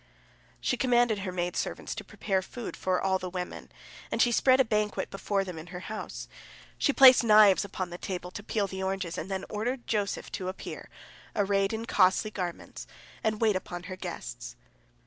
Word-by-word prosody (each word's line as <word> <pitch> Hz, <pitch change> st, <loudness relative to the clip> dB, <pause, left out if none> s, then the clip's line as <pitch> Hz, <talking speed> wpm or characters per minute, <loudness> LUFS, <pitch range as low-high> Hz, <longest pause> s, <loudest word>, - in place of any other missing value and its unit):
She 250 Hz, -, 0 dB
commanded 240 Hz, -4 st, +3 dB
her 190 Hz, -1 st, -4 dB
maid 175 Hz, -1 st, -2 dB
servants -, -, -3 dB
to -, -, -6 dB
prepare 195 Hz, -2 st, -1 dB
food 235 Hz, +5 st, -7 dB
for 185 Hz, -1 st, 0 dB
all 190 Hz, -1 st, +1 dB
the 185 Hz, -, -5 dB
women, 180 Hz, 0 st, -6 dB, 0.4 s
and -, -, -2 dB
she 240 Hz, -, +5 dB
spread 260 Hz, +2 st, +4 dB
a 265 Hz, -, +5 dB
banquet 210 Hz, -1 st, -1 dB
before 195 Hz, 0 st, -1 dB
them 180 Hz, -4 st, -7 dB
in 160 Hz, -, -10 dB
her 180 Hz, 0 st, -7 dB
house. 215 Hz, +3 st, -6 dB, 0.5 s
She -, -, +3 dB
placed 260 Hz, -2 st, +8 dB
knives 210 Hz, -3 st, +7 dB
upon 190 Hz, -3 st, -5 dB
the 175 Hz, -, -7 dB
table 180 Hz, -1 st, -5 dB
to 205 Hz, -, -7 dB
peel 210 Hz, 0 st, -1 dB
the 190 Hz, -1 st, -5 dB
oranges, 190 Hz, -3 st, -2 dB
and 175 Hz, -, -5 dB
then 190 Hz, -1 st, -3 dB
ordered 240 Hz, +4 st, -3 dB
Joseph 205 Hz, -2 st, -2 dB
to 185 Hz, -, -4 dB
appear, 190 Hz, -, -7 dB, 0.5 s
arrayed 195 Hz, -1 st, +2 dB
in 225 Hz, 0 st, -3 dB
costly 195 Hz, 0 st, +3 dB
garments, 180 Hz, -4 st, -5 dB, 0.4 s
and 215 Hz, 0 st, 0 dB
wait 220 Hz, -3 st, +4 dB
upon 175 Hz, -1 st, -5 dB
her 185 Hz, 0 st, -6 dB
guests. -, -, -7 dB
195 Hz, 185 wpm, -29 LUFS, 185-215 Hz, 0.5 s, placed